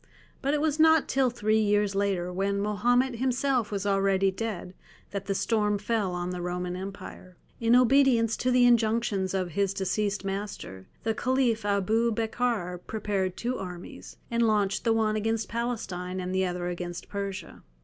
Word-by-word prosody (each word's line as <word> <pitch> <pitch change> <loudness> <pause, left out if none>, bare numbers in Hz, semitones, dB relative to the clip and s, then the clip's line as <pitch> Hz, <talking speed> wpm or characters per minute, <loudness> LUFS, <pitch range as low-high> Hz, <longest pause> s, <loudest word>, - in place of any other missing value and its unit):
But 280 +2 +1
it 295 - 0
was 310 -1 0
not 320 -1 +5
till 265 -1 +2
three 220 -2 +1
years 205 -1 +2
later, 195 -3 -1
when 200 +2 0
Mahomet 240 +5 +1
himself 255 -2 0
was 200 -1 -2
already 195 -1 +2
dead, 195 -3 -5 0.4
that 200 -1 -5
the 195 - 0
storm 210 -1 +1
fell 205 -2 -1
on 180 0 -3
the 180 -1 -4
Roman 180 0 -3
Empire. 185 -1 -8 0.2
In 230 +1 +4
obedience 250 -3 +4
to 255 - 0
the 250 -1 +5
injunctions 220 -5 +2
of 185 -2 -1
his 200 +3 0
deceased 200 +1 -1
master, 195 - -5 0.2
the 225 - +1
Caliph 245 -3 +1
Abu 215 +3 +2
Bekr 220 -5 -1
prepared 200 -4 -2
two 245 +2 -2
armies, 180 -2 -8
and 235 0 +1
launched 210 -3 +1
the 230 - +4
one 220 -1 +1
against 225 +1 -1
Palestine 210 -6 -3
and 185 0 -3
the 190 0 +1
other 180 0 -3
against 175 0 -5
Persia. 200 -3 -5
205 Hz, 165 wpm, -27 LUFS, 190-235 Hz, 0.4 s, not